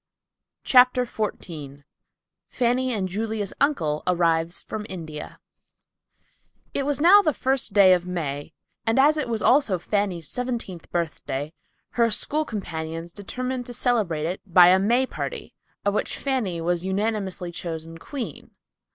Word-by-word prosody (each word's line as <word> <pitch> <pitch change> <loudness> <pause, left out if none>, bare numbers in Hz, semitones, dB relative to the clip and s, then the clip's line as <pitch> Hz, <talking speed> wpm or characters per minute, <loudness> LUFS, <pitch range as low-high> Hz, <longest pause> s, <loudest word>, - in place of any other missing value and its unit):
CHAPTER 250 -1 +5
XIV 155 - -5 0.7
FANNY 255 +1 +1
AND 200 -5 -1
JULIA'S 210 +1 -3
UNCLE 160 - +1
ARRIVES 170 -1 +1
FROM 215 -1 -6
INDIA 160 -5 -7 1.4
It 275 0 0
was 290 -1 0
now 370 +7 +8
the 310 -7 0
first 260 -5 0
day 195 -2 +7
of 180 0 0
May, 155 -4 -4 0.3
and 225 - +2
as 295 +3 +6
it 295 -5 -2
was 225 -2 -1
also 250 -8 +4
Fanny's 180 -3 -1
seventeenth 235 -9 -4
birthday, 160 -3 -3 0.4
her 235 -1 +2
school 295 +7 0
companions 165 - -5
determined 250 +5 -4
to 245 - -7
celebrate 215 - 0
it 180 +3 -3
by 180 -2 +7
a 185 +1 +5
May 240 +7 +3
party, - - -6 0.3
of 200 - +2
which - - -1
Fanny 245 -11 -1
was 170 +1 -1
unanimously 190 -2 -2
chosen 165 -1 -6
queen. 265 - -7
200 Hz, 135 wpm, -24 LUFS, 170-245 Hz, 1.4 s, now